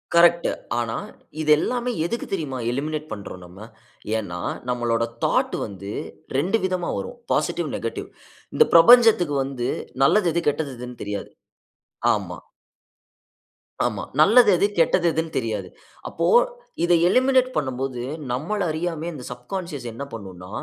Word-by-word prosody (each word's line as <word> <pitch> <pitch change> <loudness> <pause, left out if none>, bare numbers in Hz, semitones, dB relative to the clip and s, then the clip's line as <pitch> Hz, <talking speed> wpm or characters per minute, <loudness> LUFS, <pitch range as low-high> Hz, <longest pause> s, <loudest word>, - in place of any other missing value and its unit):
Correct. 170 0 +5 0.3
ஆனா 115 -1 -2 0.5
இது 155 - -2
எல்லாமே 245 +6 -1
எதுக்கு 235 +7 -3
தெரியுமா 150 -8 -2
எலிமினேட் 155 +4 -3
பண்றோம், 100 -3 -8
நம்ம? 90 +2 -14 0.6
ஏன்னா 90 -5 -5 0.3
நம்மளோட 120 -1 0 0.2
தாட் - - +1
வந்து 100 0 -8 0.5
2 185 +10 +1
விதமா 185 -2 -1
வரும், - - -6 0.2
பாசிட்டிவ், - - 0
நெகட்டிவ். - - -5 0.5
இந்த 460 - +6
பிரபஞ்சத்துக்கு 215 -5 +7
வந்து 130 -3 -3 0.3
நல்லது 180 +5 +4
எது, 170 - +1
கெட்டது 145 -2 -3
எதுன்னு 125 0 -9
தெரியாது. 105 0 -5 0.9
ஆமா. - - -6 1.5
ஆமா. - - -2 0.2
நல்லது 215 +8 +7
எது, 200 - +3
கெட்டது 170 +1 +3
எதுன்னு 160 0 -3
தெரியாது. 110 -6 -2 0.4
அப்போ - - -2 0.6
இதை 175 0 +4
எலிமினேட் 255 +4 +3
பண்ணும்போது, 130 -2 -2 0.3
நம்மள 160 +12 -2
அறியாமயே 165 +1 -3
இந்த 135 -5 -8
சப்கான்ஷியஸ் 140 +3 -6
என்ன 115 +5 -6
பண்ணும்ன்னா, 95 -4 -9
150 Hz, 125 wpm, -23 LUFS, 120-175 Hz, 1.5 s, பிரபஞ்சத்துக்கு